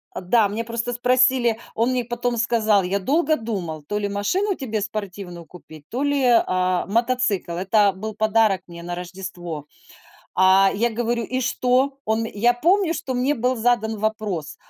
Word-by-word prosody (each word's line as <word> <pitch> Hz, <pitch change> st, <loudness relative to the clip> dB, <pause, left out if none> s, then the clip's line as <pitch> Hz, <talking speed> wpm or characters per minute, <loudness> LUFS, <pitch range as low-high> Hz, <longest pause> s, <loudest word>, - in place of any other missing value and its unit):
Э, -, -, -4 dB
да, 210 Hz, +4 st, +3 dB
мне 215 Hz, +3 st, -3 dB
просто 235 Hz, +1 st, -3 dB
спросили 250 Hz, -1 st, +3 dB, 0.2 s
Он 235 Hz, +3 st, +1 dB
мне 250 Hz, -2 st, -1 dB
потом 240 Hz, 0 st, -2 dB
сказал: 220 Hz, -3 st, +2 dB
"Я 195 Hz, +3 st, -1 dB
долго 310 Hz, -, +2 dB
думал, 185 Hz, -, -5 dB
то 205 Hz, +8 st, -3 dB
ли 205 Hz, -1 st, -2 dB
машину 365 Hz, -, 0 dB
тебе 220 Hz, -6 st, -3 dB
спортивную 195 Hz, -4 st, -6 dB
купить, 155 Hz, -4 st, -14 dB
то 260 Hz, +4 st, -2 dB
ли, 285 Hz, -2 st, +1 dB
а, 185 Hz, -6 st, +2 dB
мотоцикл". 230 Hz, -4 st, 0 dB
Это 195 Hz, +3 st, +2 dB
был 215 Hz, +2 st, -6 dB
подарок 215 Hz, -3 st, +2 dB
мне 170 Hz, 0 st, -10 dB
на 175 Hz, 0 st, -4 dB
Рождество. 175 Hz, -4 st, -7 dB, 0.7 s
А, 190 Hz, +1 st, +5 dB
я 235 Hz, +4 st, +1 dB
говорю: 235 Hz, 0 st, -1 dB
"И 255 Hz, 0 st, -2 dB
что?" 260 Hz, +2 st, +1 dB
Он 220 Hz, +1 st, 0 dB
я 225 Hz, +2 st, +2 dB
помню, 340 Hz, +6 st, +2 dB
что 260 Hz, -, -4 dB
мне 255 Hz, +4 st, +1 dB
был 250 Hz, +2 st, 0 dB
задан 225 Hz, -2 st, +1 dB
вопрос: 210 Hz, -8 st, -3 dB
220 Hz, 165 wpm, -22 LUFS, 190-245 Hz, 0.7 s, А